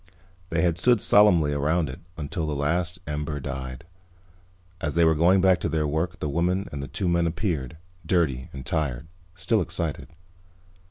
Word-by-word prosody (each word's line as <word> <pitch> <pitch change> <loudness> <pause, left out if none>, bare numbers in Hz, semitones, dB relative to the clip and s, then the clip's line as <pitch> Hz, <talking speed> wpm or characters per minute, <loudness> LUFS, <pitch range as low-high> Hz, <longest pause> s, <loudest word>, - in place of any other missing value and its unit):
They 85 -1 0
had 85 -1 +1
stood 120 +4 +4
solemnly 90 -9 +4
around 80 +3 +1
it 65 - -7 0.2
until 80 +1 -3
the 75 - -2
last 85 +5 0
ember 75 0 -3
died. 65 0 -6 0.9
As 75 -5 -3
they 85 0 +5
were 80 - +5
going 90 +5 +4
back 95 -2 +4
to - - -2
their 80 -1 0
work 80 +5 -1
the - - -2
woman 90 +6 0
and 70 - -5
the 70 - -5
two 90 +8 -2
men 85 -1 +2
appeared, 80 - -2 0.3
dirty 70 -10 0
and 65 -1 -8
tired, 70 -3 -1 0.3
still 110 +4 +1
excited. 85 -2 -3
80 Hz, 170 wpm, -25 LUFS, 75-90 Hz, 0.9 s, they